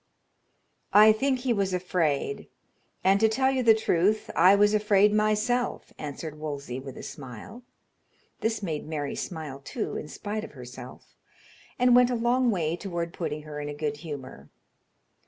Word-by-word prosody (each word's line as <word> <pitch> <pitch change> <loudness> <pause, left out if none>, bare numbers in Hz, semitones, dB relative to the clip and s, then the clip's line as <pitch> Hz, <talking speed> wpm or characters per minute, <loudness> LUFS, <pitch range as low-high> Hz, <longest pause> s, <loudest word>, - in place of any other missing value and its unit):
"I 215 +1 +8
think 260 +3 0
he 250 -2 +1
was 195 -3 0
afraid; 180 - -1 0.6
and, 195 +1 +4
to 220 +1 +4
tell 265 +4 +2
you 265 -1 0
the 225 -2 +6
truth, 210 0 +1
I 190 +2 +7
was 205 +1 +4
afraid 210 -1 +4
myself," 215 +3 0
answered 150 +1 -6
Wolsey, 140 -4 -5
with 135 -1 -9
a - - -8
smile. 135 - -9 0.8
This 225 -2 -1
made 155 -5 -3
Mary 145 -3 -3
smile, 155 -6 -6
too, 140 - -4
in - - -6
spite 210 +6 -5
of 225 - -9
herself, 125 -1 -11 0.6
and 250 -1 +5
went 250 0 +6
a 250 - 0
long 240 +2 +2
way 170 -6 0
toward 170 -2 -4
putting 150 -4 -4
her 150 -1 -7
in 145 0 -4
a 145 - -6
good 150 -1 -3
humor. 140 - -8
185 Hz, 160 wpm, -27 LUFS, 150-220 Hz, 0.8 s, I